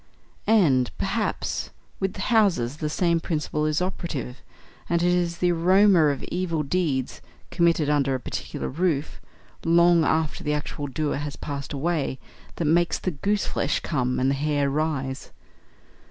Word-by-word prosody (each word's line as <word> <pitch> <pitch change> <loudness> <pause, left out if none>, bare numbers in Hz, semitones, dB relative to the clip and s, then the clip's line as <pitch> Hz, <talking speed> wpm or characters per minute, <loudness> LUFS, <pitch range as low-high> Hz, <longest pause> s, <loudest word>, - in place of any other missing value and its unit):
And, 145 - +4
perhaps, - - -2 0.3
with 190 -1 -2
houses 190 - +2
the 155 -1 -2
same 170 +1 +1
principle 155 -2 -2
is 155 +3 +1
operative, 155 -9 -4 0.5
and 170 0 +1
it 175 0 +3
is 175 -1 0
the 180 +1 +2
aroma 185 +1 +5
of 140 -2 -1
evil 170 -4 -2
deeds 140 -4 -1 0.3
committed 170 -3 +2
under 140 -2 +2
a - - -3
particular - - -5
roof, 160 -1 -1 0.4
long 170 0 +5
after 160 -1 0
the 150 - 0
actual 145 -1 -4
doers 145 +1 -2
have 145 -1 -6
passed 140 -1 -5
away, 150 -2 -1 0.4
that 170 - -2
makes 170 +3 +2
the 185 - -2
gooseflesh 200 -2 -1
come 125 -5 -1
and 130 +1 +2
the - - +2
hair 145 0 0
rise. 140 -3 -2
155 Hz, 145 wpm, -25 LUFS, 140-175 Hz, 0.5 s, aroma